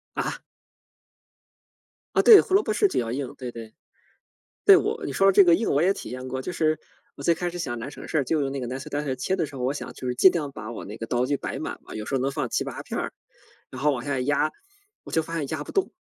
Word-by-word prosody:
啊？ - - -2 1.8
啊 - - +6
对， 435 -4 +10
胡 - - -5
萝 395 - +6
卜 - - -2
是 410 - +3
比 - - -1
较 115 -1 -2
硬， 135 0 -4
对 125 -2 -6
对。 115 -2 -10 0.9
对， 400 - +9
我 435 +2 -2
你 - - -3
说 195 - +3
的 195 - +6
这 195 0 +7
个 170 - +6
硬 215 +6 0
我 145 +3 +3
也 190 - +4
体 - - -8
验 130 +1 -6
过， 130 0 -3
就 130 - -5
是 155 -3 +1 0.4
我 140 - -9
最 170 +3 +3
开 175 +1 -3
始 175 - -7
想 120 -8 -3
拿 115 +4 -6
省 - - -10
事， 150 -4 +1
就 155 +3 0
用 135 -1 -1
那 135 - -4
个 125 - -3
nicer 130 +2 -5
dicer 145 -2 -2
切 185 +9 -1
的 170 - 0
时 145 - -8
候， 130 - -5
我 135 +3 0
想 - - -6
就 130 - -6
是 125 - -1
尽 185 +9 +6
量 150 -5 -2
把 115 -3 -7
我 - - -7
那 105 +2 -8
个 115 - -6
刀 125 +2 0
具 145 +1 +1
摆 - - -5
满 - - -5
了， - - -9
有 105 0 -5
时 - - -3
候 130 - +1
能 135 - +1
放 135 -3 -2
7-8 - - -3
片 - - -5
儿， - - -3 0.6
然 130 0 -8
后 150 - +4
往 120 -2 -4
下 140 -2 -1
压， 145 +3 +1 0.5
我 - - -9
就 160 - +3
发 165 +1 -6
现 145 -3 -2
压 155 0 -3
不 - - -9
动， 390 - +1
145 Hz, 325 characters per minute, -25 LUFS, 125-170 Hz, 1.8 s, 对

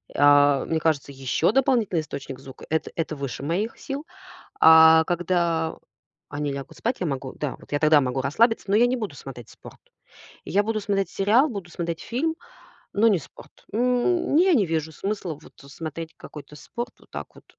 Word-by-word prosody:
А, 145 -1 +5
мне 160 - -1
кажется, 155 -3 0
ещё 135 +6 0
дополнительный 235 - +2
источник 135 -3 -7
звука- 135 -1 -12
это 160 0 -1
это 160 -2 -2
выше 140 -1 -5
моих 190 +9 -2
сил. 280 +3 -6 0.5
А 160 0 +8
когда 170 -2 0 0.5
они 145 -1 -3
лягут 140 -1 -7
спать, 240 +3 -2
я 180 - -1
могу. 135 -2 -4
Да, 150 -3 -4
вот - - -18
я 145 - +2
тогда 155 -1 +5
могу 130 +1 -1
расслабиться, 225 - +2
но 200 - +4
я 240 +3 +5
не 255 - 0
буду 215 - -5
смотреть 125 -5 -10
спорт. - - -14 0.7
Я 205 +3 +1
буду 215 0 -2
смотреть 200 -1 -1
сериал, 225 +9 +3
буду 195 -6 -7
смотреть 170 -1 -4
фильм, 310 +7 -2 0.6
но 220 +3 +4
не 200 -5 +3
спорт. 140 - -15
М, 250 - +1
я 370 +2 +5
не 205 -8 +3
вижу 160 -1 -2
смысла 195 -2 -4
вот - - -16 0.2
смотреть 160 +1 -7
какой-то 150 0 -11
спорт 240 - -6
вот - - -23
так - - -8
вот. - - -17
165 Hz, 180 wpm, -24 LUFS, 145-220 Hz, 0.7 s, А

